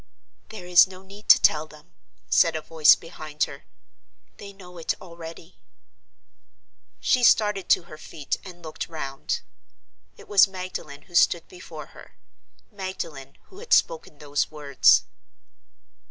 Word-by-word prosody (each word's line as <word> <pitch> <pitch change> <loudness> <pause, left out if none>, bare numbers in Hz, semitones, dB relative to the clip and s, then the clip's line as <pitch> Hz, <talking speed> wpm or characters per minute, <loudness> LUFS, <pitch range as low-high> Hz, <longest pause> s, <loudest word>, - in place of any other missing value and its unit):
"There 215 -5 -10
is 180 +1 +6
no 185 0 -13
need 200 +2 -15
to - - +9
tell 155 0 +2
them," 150 -13 -18 0.3
said 160 - +3
a 155 - -3
voice 160 -2 +5
behind 155 -2 -5
her. 140 - -6 0.7
"They 200 - -10
know 180 -3 -14
it 165 - -3
already." 170 -1 -12 1.4
She 250 - +1
started 210 -5 +3
to - - +4
her 155 -2 -13
feet 150 -4 -5
and 175 -3 -12
looked 155 +1 -7
round. 140 -4 -4 0.8
It - - -15
was 200 -1 +5
Magdalen 185 -6 -8
who 175 - -22
stood 170 0 +3
before 165 -4 -11
her—Magdalen 175 - -10
who 385 - -14
had 470 +1 -2
spoken 480 - +1
those 145 0 -2
words. 145 -3 +3
170 Hz, 135 wpm, -24 LUFS, 150-190 Hz, 1.4 s, to